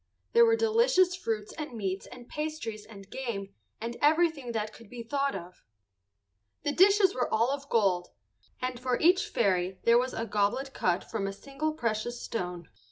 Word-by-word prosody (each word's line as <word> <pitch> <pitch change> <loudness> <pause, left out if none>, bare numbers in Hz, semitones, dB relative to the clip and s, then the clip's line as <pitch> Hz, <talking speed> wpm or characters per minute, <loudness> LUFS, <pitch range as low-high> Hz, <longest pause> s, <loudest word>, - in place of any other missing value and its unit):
There 470 0 +7
were 455 - +5
delicious 450 -5 +3
fruits 220 - -3
and 305 -4 -5
meats 195 -2 -3
and 245 -1 -12
pastries 300 -9 -5
and 200 -3 -12
game 210 -6 -5 0.3
and 235 +1 -5
everything 310 -4 +3
that 215 -1 -2
could 230 -3 -14
be 240 0 -7
thought 275 +2 -1
of. 180 -1 -9 1.0
The 290 - +1
dishes 385 +3 +5
were 250 - -1
all 230 +4 +2
of 280 0 -4
gold, 190 -6 +2 0.5
and 255 -1 -3
for 250 0 0
each 370 +5 +4
fairy 190 - +1
there 235 +1 +6
was 255 +1 -2
a 230 - -2
goblet 215 +6 0
cut 180 -1 +1
from 205 -3 -3
a 195 - -3
single 280 +8 -3
precious 235 -1 -2
stone. 180 -5 -4
240 Hz, 170 wpm, -29 LUFS, 210-305 Hz, 1.0 s, There